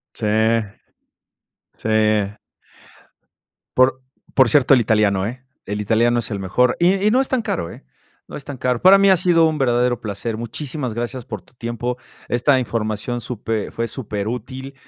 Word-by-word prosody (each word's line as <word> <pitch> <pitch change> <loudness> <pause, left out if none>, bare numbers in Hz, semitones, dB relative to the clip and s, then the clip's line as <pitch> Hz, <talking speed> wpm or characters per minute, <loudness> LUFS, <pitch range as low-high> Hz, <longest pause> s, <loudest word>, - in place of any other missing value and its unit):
Sí, 110 - -3 1.5
sí. 110 -1 +1 1.4
Por 130 +1 +3 0.3
por 130 -3 +5
cierto, 140 -2 +5
el 125 - +4
italiano, 105 -4 +2
eh, 125 +4 -6 0.2
el 105 +1 -3
italiano 120 +3 +2
es 115 - -7
el 100 - -3
mejor. 110 +7 +1
Y 180 +3 +4
y - - +5
no 255 +3 +3
es 270 - -1
tan 255 -3 0
caro, 85 - -3
eh, - - -14 0.4
no - - -8
es 140 - -9
tan 140 -2 -7
caro. 125 -1 0
Para 195 +2 +8
mí 200 0 +4
ha 190 - +6
sido 170 -2 +3
un 155 -1 -1
verdadero 120 -2 +1
placer. 110 +1 -4
Muchísimas 130 +1 -5
gracias 120 +1 -4
por 110 -6 -7
tu - - -27
tiempo. 120 +1 -4 0.3
Esta 130 +3 +3
información 115 0 -3
supe 110 -2 -4
fue 115 0 -3
superútil. 125 +4 -5
120 Hz, 165 wpm, -20 LUFS, 110-130 Hz, 1.5 s, Para